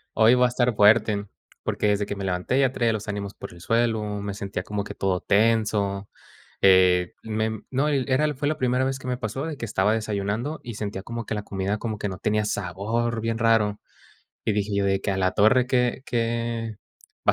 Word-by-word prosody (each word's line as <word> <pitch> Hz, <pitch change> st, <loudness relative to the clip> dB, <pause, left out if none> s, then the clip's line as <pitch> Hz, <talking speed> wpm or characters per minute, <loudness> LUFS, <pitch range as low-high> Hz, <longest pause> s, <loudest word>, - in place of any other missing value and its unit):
hoy 110 Hz, +2 st, +6 dB
va 125 Hz, 0 st, +5 dB
a -, -, -2 dB
estar 120 Hz, -1 st, +1 dB
fuerte". 105 Hz, -1 st, +4 dB, 0.4 s
Porque 105 Hz, -, 0 dB
desde 105 Hz, 0 st, +1 dB
que 100 Hz, -, -3 dB
me 100 Hz, -1 st, -5 dB
levanté 90 Hz, +8 st, 0 dB
ya 130 Hz, -2 st, +3 dB
traía 115 Hz, -3 st, +1 dB
los 110 Hz, 0 st, -5 dB
ánimos 100 Hz, -1 st, -4 dB
por -, -, -9 dB
el 85 Hz, -, -14 dB
suelo, 115 Hz, 0 st, +1 dB, 0.2 s
me 100 Hz, 0 st, -4 dB
sentía 100 Hz, -2 st, -4 dB
como 105 Hz, 0 st, -3 dB
que -, -, -8 dB
todo 95 Hz, -2 st, 0 dB
tenso, 105 Hz, -2 st, +1 dB, 0.5 s
eh, 90 Hz, -2 st, +5 dB
mem 110 Hz, 0 st, -2 dB
no, 135 Hz, +3 st, +1 dB
y -, -, +3 dB
l 130 Hz, -, -1 dB
era 145 Hz, +4 st, +3 dB
el 150 Hz, -, 0 dB
fue 145 Hz, +1 st, -2 dB
la 155 Hz, -, 0 dB
primera 125 Hz, +1 st, +1 dB
vez 135 Hz, 0 st, -1 dB
que 130 Hz, -, -13 dB
me 125 Hz, -1 st, -1 dB
pasó 125 Hz, +5 st, -4 dB
de 160 Hz, -2 st, -4 dB
que 120 Hz, -, -5 dB
estaba 105 Hz, 0 st, +1 dB
desayunando 110 Hz, +6 st, -2 dB
y 120 Hz, -, -6 dB
sentía 100 Hz, -2 st, -4 dB
como 115 Hz, +1 st, -6 dB
que 110 Hz, -, -2 dB
la 105 Hz, -, -4 dB
comida 100 Hz, +2 st, -2 dB
como 110 Hz, -1 st, -4 dB
que 100 Hz, -, -2 dB
no 95 Hz, -, -6 dB
tenía 105 Hz, +2 st, 0 dB
sabor, 105 Hz, +4 st, -2 dB
bien 115 Hz, 0 st, -1 dB
raro. 110 Hz, -2 st, +2 dB, 0.7 s
Y 110 Hz, -, +4 dB
dije 105 Hz, 0 st, -1 dB
yo 100 Hz, -, +1 dB
de 95 Hz, 0 st, +1 dB
que: 100 Hz, -, -2 dB
"A 95 Hz, -, 0 dB
la 95 Hz, 0 st, +2 dB
torre, 125 Hz, +5 st, +4 dB
que 125 Hz, 0 st, +1 dB
que 115 Hz, -1 st, -2 dB, 0.5 s
va -, -, +8 dB
110 Hz, 225 wpm, -25 LUFS, 100-120 Hz, 0.7 s, va